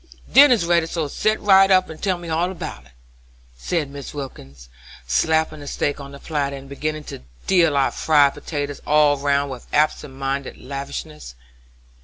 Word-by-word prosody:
Dinner's 255 -9 +7
ready, 170 -1 +2
so 165 -2 -2
set 215 +9 0
right 195 -1 +6
up 185 -1 +4
and 160 -1 -10
tell 190 -3 0
me 175 -1 -9
all 165 +2 0
about 155 - -8
it," 60 - -25 0.6
said 145 - -3
Mrs. 140 +1 -8
Wilkins, 70 - -9 0.4
slapping 155 - +1
the 145 - -10
steak 145 +1 -2
on 140 0 -9
to 140 - -10
the - - -19
platter, 140 -3 -2
and 135 0 -10
beginning 155 +2 -4
to - - -8 0.3
deal 165 -6 +3
out 135 - +2
fried 145 -3 +3
potatoes 145 -2 -5
all 150 -1 +4
round 140 0 0
with 125 -2 -9
absent 150 -2 0
minded 135 0 -3
lavishness. 140 - -7
145 Hz, 175 wpm, -21 LUFS, 140-165 Hz, 0.6 s, Dinner's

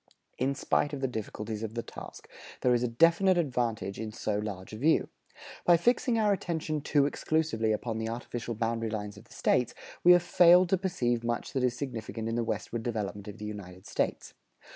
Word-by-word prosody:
In 135 +2 +1
spite 145 +1 0
of 140 - -4
the 135 - +1
difficulties 110 -2 -5
of 110 0 -5
the 115 - -2
task, - - -10 0.3
there 125 - +4
is 120 - +2
a 125 - +1
definite 170 +9 +4
advantage 120 - -1
in 110 -1 -4
so 105 -1 -2
large 100 -2 -6
a - - -5
view. 155 +7 +2 0.5
By 175 -1 +6
fixing 240 - +2
our 210 -2 +3
attention 160 -5 -2
too 145 0 +3
exclusively 145 -7 0
upon 110 +1 -2
the 110 0 -2
artificial 120 0 -5
boundary 115 0 -1
lines 105 -1 -4
of 100 +3 -14
the - - -17
States, 125 -1 +1 0.3
we 180 - +9
have 175 -1 +4
failed 175 +1 +6
to 190 - +3
perceive 120 -11 0
much 120 0 -2
that 130 - 0
is 125 -1 +1
significant 115 -4 -4
in 115 - -2
the 120 - +1
westward 115 0 -3
development 105 -3 -4
of 105 - -8
the 105 - -7
United 95 -3 -8
States. - - -2
120 Hz, 200 wpm, -29 LUFS, 110-155 Hz, 0.5 s, we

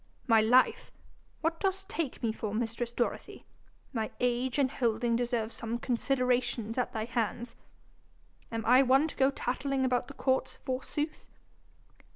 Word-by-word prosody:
'My 225 -3 +5
life! 245 +4 +3 0.5
what 330 +1 0
dost 385 -1 -1
take 330 - -4
me 225 - +2
for, 215 -1 -4
mistress 235 +1 -2
Dorothy? 240 0 -3 0.5
My 220 -3 -1
age 245 +1 0
and 270 -2 +2
holding 235 -2 +1
deserves 235 -2 -1
some 230 +1 -4
consideration 250 -2 0
at 250 - 0
thy 220 -1 -2
hands! 235 0 -2 1.0
Am 225 -1 -3
I 250 +3 +7
one 270 +3 +4
to - - -9
go 265 0 +4
tattling 270 +1 -1
about 250 -1 +1
the - - -10
courts 260 -1 0
forsooth?' 295 +4 -3
245 Hz, 145 wpm, -30 LUFS, 230-265 Hz, 1.0 s, I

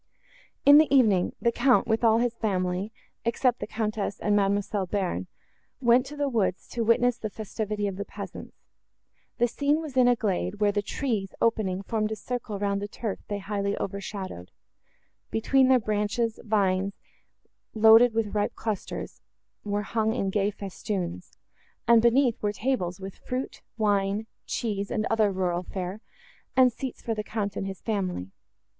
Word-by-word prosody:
In 285 +1 +9
the 310 -4 +3
evening, 215 -10 +4
the 235 - +2
Count, 250 +2 +3
with 225 +1 0
all 225 -1 +5
his 240 0 +1
family, 190 -2 -1 0.3
except 240 +1 +1
the - - -4
Countess 215 -2 -2
and 210 -1 +1
Mademoiselle 200 -1 +1
Bearn, 175 - -2 0.5
went 250 +1 +4
to 295 - -8
the 290 -1 0
woods 215 -8 0
to 235 - -2
witness 235 +2 +3
the 215 - -3
festivity 210 0 -3
of 195 -2 -3
the 200 - -2
peasants. - - -9 0.8
The 240 - +3
scene 285 +5 +1
was 310 -5 -7
in 255 -1 +5
a 245 - +5
glade, 205 -2 -2
where 205 -1 +3
the 205 0 0
trees, 205 -3 -3
opening, 200 -5 +1
formed 215 +1 -1
a - - -1
circle 235 -2 -4
round 200 0 -1
the 205 - -3
turf 205 -1 -4
they 205 - -2
highly 200 0 -2
overshadowed; 195 - -5 0.8
between 260 +4 +3
their 260 0 +6
branches, 215 +1 -1
vines, 195 -3 +1 0.8
loaded 225 +2 +7
with 220 -3 0
ripe 205 -1 0
clusters, 220 -3 -5 0.4
were 205 0 -1
hung 220 +1 0
in 195 -6 -1
gay 205 0 +1
festoons; 190 - -5 0.5
and, 230 -1 +7
beneath, 240 +1 +3
were 210 - +1
tables, 205 -7 -1
with 195 0 -8
fruit, 255 +1 -4 0.2
wine, 205 -1 +1 0.2
cheese 200 -3 -2
and 215 - -1
other 215 -2 +3
rural 180 -2 -1
fare,—and 205 +7 -2
seats 260 +1 -6
for 230 - -1
the 215 -1 -3
Count 210 -2 -3
and 195 - -3
his 190 -2 -7
family. 185 - -2
215 Hz, 160 wpm, -27 LUFS, 200-235 Hz, 0.8 s, In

